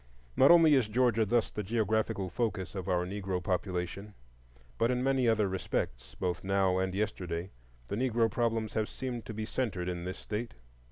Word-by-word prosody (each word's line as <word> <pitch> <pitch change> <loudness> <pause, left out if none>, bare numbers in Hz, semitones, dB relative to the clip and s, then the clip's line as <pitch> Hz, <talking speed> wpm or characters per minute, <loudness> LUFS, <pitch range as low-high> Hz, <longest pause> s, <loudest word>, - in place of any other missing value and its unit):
Not 135 - +6
only 165 -3 +7
is 130 -6 +4
Georgia 115 -1 +2
thus 120 +1 +1
the 105 - -3
geographical 110 -3 0
focus 105 -3 -2
of 95 -1 -4
our 90 -1 +1
Negro 95 -1 -3
population, 90 +2 -3 0.6
but 115 +1 +3
in 125 0 0
many 135 -2 +2
other 110 -3 +3
respects, 65 -9 -3
both 90 -1 -2
now 95 -1 +2
and 95 0 -1
yesterday, 95 -4 -3 0.4
the - - -3
Negro 120 -1 +2
problems 115 -1 -1
have 110 -1 0
seemed 125 -3 -5
to 110 - -5
be 110 0 -3
centered 105 -8 -2
in 90 -1 -3
this 90 +1 -4
State. 110 +2 -5
105 Hz, 175 wpm, -31 LUFS, 95-115 Hz, 0.6 s, only